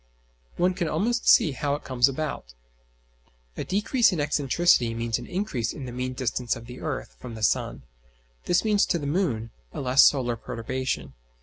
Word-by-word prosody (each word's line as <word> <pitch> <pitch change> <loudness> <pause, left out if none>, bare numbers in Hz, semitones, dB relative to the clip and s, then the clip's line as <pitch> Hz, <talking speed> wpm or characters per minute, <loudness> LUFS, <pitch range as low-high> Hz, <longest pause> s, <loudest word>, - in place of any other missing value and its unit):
One 180 +1 +2
can 175 -2 -2
almost 235 +7 +1
see 155 - +6
how 140 +1 -1
it 145 - -8
comes 125 0 +3
about. 135 - -5 1.0
A - - -3
decrease 210 +5 +2
in 180 - -2
excentricity 145 -4 +2
means 115 0 -1
an 120 - -9
increase 175 - -2
in 125 -3 -7
mean 130 0 -3
distance 125 -1 -1
of 115 - -10
the 125 +1 -10
earth - - -4
from 115 - -8
the 110 - -7
sun. - - 0 0.6
This 175 - +2
means 210 -2 +3
to - - +1
the 145 - -5
moon 140 - -1 0.2
a - - -6
less 130 0 +4
solar 125 -4 +3
perturbation. 130 +3 -4
130 Hz, 175 wpm, -26 LUFS, 120-175 Hz, 1.0 s, see